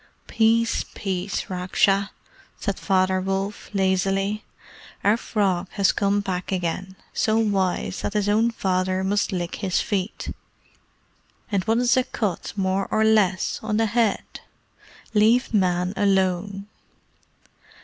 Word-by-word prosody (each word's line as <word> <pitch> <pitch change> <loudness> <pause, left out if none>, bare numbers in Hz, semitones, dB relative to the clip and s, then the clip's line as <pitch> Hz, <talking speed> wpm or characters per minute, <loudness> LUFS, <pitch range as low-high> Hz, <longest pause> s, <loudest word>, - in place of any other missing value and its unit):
"Peace, 230 +1 +2
peace, 190 0 -2
Raksha!" 195 +2 +1 0.5
said 200 -3 -3
Father 185 -1 +2
Wolf, 195 +2 -3
lazily. 195 +1 0 0.6
"Our 205 +2 +4
Frog 195 -5 0
has 200 -3 +3
come 200 0 +1
back 185 -2 -3
again 185 +1 -2 0.2
so 220 0 +1
wise 195 -4 0
that 205 - -3
his 205 -1 +1
own 220 +3 +3
father 185 -3 0
must 200 +2 0
lick 175 -2 -3
his 190 -3 0
feet; 200 -2 -3 1.2
and 195 -3 +1
what 225 +1 +2
is 245 0 +3
a 255 - +4
cut, 210 -8 -3
more 190 0 0
or 215 - +2
less, 210 -4 +2
on 215 -1 -1
the 225 - +3
head? 225 -1 0 0.7
Leave 225 +4 +3
Men 180 -2 +1
alone." 195 0 +1
195 Hz, 125 wpm, -24 LUFS, 185-215 Hz, 1.2 s, Our